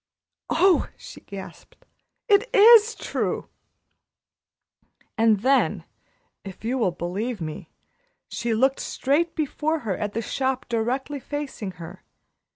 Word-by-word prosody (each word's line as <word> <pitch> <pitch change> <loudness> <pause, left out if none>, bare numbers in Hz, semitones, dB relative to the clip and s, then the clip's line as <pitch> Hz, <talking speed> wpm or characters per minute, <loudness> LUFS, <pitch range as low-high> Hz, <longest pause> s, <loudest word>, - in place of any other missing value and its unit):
"Oh!" 380 -1 +3
she - - -12
gasped. 195 -1 -11 0.4
"It 420 +3 +4
is 445 +1 +7
true!" - - -3 1.7
And 220 -3 +3
then, 270 +3 +2 0.6
if 195 +2 -10
you 255 +3 -1
will 220 - +2
believe 190 +7 -4
me, 155 -2 -6 0.6
she 235 -1 -2
looked 265 +4 +2
straight 305 +5 0
before 310 +1 -1
her 210 -6 -2
at 205 +1 -4
the 230 - -2
shop 260 +1 -2
directly 255 +5 -2
facing 270 -9 -5
her. 175 +2 -11
250 Hz, 115 wpm, -24 LUFS, 205-295 Hz, 1.7 s, is